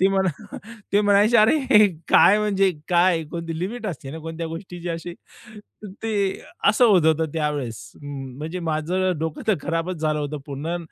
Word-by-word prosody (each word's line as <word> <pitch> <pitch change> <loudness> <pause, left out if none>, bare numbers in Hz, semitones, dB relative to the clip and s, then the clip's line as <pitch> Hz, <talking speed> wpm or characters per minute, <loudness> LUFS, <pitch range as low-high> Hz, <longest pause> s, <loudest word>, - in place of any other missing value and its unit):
ते 190 - +5
म्हणा, 195 +1 -2 0.4
ते 205 - +4
म्हणायचे, 205 +3 +4
अरे 225 -1 +5 0.2
काय, 205 - +6
म्हणजे 195 -2 +2 0.2
काय 175 -1 +3
कोणती 165 -2 -5
लिमिट 220 +6 -4
असते 140 -8 -6
ना 160 - -7
कोणत्या 165 +1 -6
गोष्टीची 175 +1 -7
अशी, 170 +1 -5 0.9
ते 205 -4 -1 0.3
असं 245 - +4
होत 185 -8 +4
होतं 160 0 +2
त्यावेळेस. 135 -10 -3
अं, 135 -3 -7
म्हणजे 160 +5 -5
माझं 170 +3 -1
डोकं 160 0 -4
तर 215 - +4
खराबच 170 +2 -2
झालं 155 -1 0
होतं 145 +1 -4
पूर्ण. 150 +4 -4
170 Hz, 160 wpm, -23 LUFS, 155-195 Hz, 0.9 s, काय